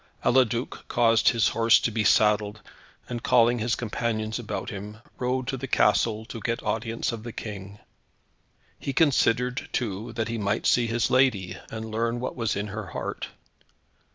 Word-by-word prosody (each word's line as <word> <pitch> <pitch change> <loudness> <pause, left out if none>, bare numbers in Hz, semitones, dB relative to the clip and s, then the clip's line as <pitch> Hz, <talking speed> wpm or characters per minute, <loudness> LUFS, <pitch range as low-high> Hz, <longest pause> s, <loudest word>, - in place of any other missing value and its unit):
Eliduc 120 -1 +1
caused 115 -2 +4
his 115 -3 +2
horse 115 0 +4
to 115 - -1
be 110 0 0
saddled, 105 0 +3 0.4
and 120 -1 -4
calling 120 0 +4
his 115 +1 0
companions 110 -1 -2
about 120 - -4
him, 105 +1 -7 0.2
rode 125 +1 -1
to 135 +1 -3
the 135 +2 -5
castle 110 -1 +2
to 115 - -8
get 115 +1 -2
audience 115 +1 -1
of 115 -2 -6
the 120 +1 -7
King. 100 -2 -7 1.0
He 140 - -3
considered, 125 -4 +2
too, 110 -1 -3
that 115 -1 -2
he 115 0 -3
might 100 0 -1
see 120 -1 +3
his 115 0 0
lady, 125 -9 +2
and 110 0 -5
learn 115 +2 -1
what 125 - -4
was 115 -3 -1
in 105 +1 -3
her 105 -1 -5
heart. 85 - -5
115 Hz, 165 wpm, -26 LUFS, 110-120 Hz, 1.0 s, caused